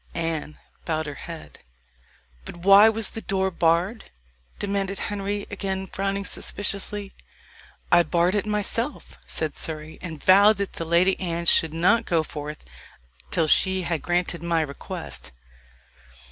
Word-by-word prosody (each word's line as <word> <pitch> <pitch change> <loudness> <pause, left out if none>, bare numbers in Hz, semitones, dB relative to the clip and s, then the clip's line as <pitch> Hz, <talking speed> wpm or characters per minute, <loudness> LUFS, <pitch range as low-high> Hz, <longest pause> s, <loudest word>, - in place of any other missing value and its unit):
Anne 165 -2 -3 0.3
bowed 160 -1 -2
her 145 - -5
head. 75 - -10 0.8
"But - - -9
why 200 +4 +7
was 220 -2 +1
the 225 - -7
door 190 -2 -1
barred?" 175 +6 +1 0.5
demanded 195 -1 -2
Henry, 205 0 -3
again 190 -1 -3
frowning 195 +1 -3
suspiciously. 200 0 -3 0.8
"I 175 -1 +7
barred 175 +1 +1
it 210 0 -1
myself," 195 - -2
said 155 - -3
Surrey, 155 0 -5
"and 160 -4 -7
vowed 200 +3 +6
that 200 -1 -3
the 165 - -5
Lady 175 +3 +3
Anne 170 -2 -3
should 165 -1 +4
not 180 +8 +3
go 165 -2 +2
forth 150 0 -8 0.6
till 165 - +1
she 190 +3 +4
had 170 -2 -2
granted 175 -1 -1
my 170 -1 +1
request." 140 - -5
180 Hz, 135 wpm, -24 LUFS, 165-200 Hz, 0.8 s, why